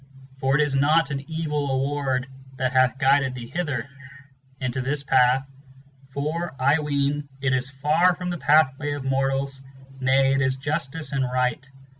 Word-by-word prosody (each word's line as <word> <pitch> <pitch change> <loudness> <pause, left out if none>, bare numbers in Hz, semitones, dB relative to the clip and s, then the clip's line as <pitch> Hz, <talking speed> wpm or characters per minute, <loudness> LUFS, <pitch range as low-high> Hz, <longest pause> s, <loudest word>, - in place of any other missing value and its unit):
for 135 0 +1
it 150 - +4
is 145 -2 -1
not 150 +3 +3
an 135 -1 -3
evil 150 -3 -2
Award 135 -1 -1 0.3
that 130 0 -1
hath 130 0 +3
guided 135 -1 +2
thee 120 -2 -7
hither, 140 -4 -3 0.7
Into 130 0 -2
this 140 +2 -2
pathŌĆö 130 0 +3 0.6
for, 150 +4 -3
I 140 +4 +3
ween, 145 -1 -1
it 135 -1 0
is 130 +1 0
far 155 +6 +2
from 180 0 -4
the 175 - -4
pathway 145 -1 +3
of 145 -2 -5
mortals 135 0 -1
ŌĆö 135 0 -19
Nay, 135 +1 +3
it 135 - +1
is 130 -1 +2
Justice 150 +2 -2
and 135 -2 0
Eight. 125 +1 -1
135 Hz, 165 wpm, -24 LUFS, 130-145 Hz, 0.7 s, it